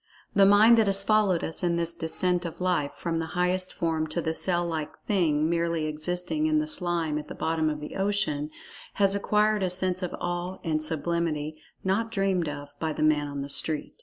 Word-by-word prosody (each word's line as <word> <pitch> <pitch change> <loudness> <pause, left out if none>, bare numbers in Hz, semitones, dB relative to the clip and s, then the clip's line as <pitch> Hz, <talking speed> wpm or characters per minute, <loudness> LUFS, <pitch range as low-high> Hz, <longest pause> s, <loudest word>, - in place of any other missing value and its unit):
The 195 -1 +5
mind 215 +3 +6
that 220 - +3
has 195 0 0
followed 205 -5 +2
us 160 - -3
in 175 -2 +1
this 170 0 0
descent 175 +2 0
of 170 -2 -7
life, 180 -6 0
from 165 -1 -3
the 165 - -3
highest 185 +1 0
form 160 -2 -1
to 155 +3 -2
the 160 -1 -1
cell 175 +1 0
like 160 -3 -4
"thing" 160 -7 +1
merely 170 -1 0
"existing" 180 - -1
in 310 0 +2
the 305 0 0
slime 175 - 0
at 150 - -9
the - - -8
bottom 160 -1 0
of 150 -1 -3
the 150 - -8
ocean, 195 -7 0 0.5
has 195 -1 +4
acquired 210 +1 +1
a 185 - +1
sense 185 0 0
of 180 - -3
awe 175 +1 -3
and 155 -2 -1
sublimity 155 -1 -2 0.2
not 200 +4 0
dreamed 195 -6 0
of 145 0 -8
by 160 -1 -2
"the - - -2
man 150 -1 +2
on 140 -1 -5
the - - -6
street." 155 +1 +3
170 Hz, 205 wpm, -27 LUFS, 155-190 Hz, 0.5 s, mind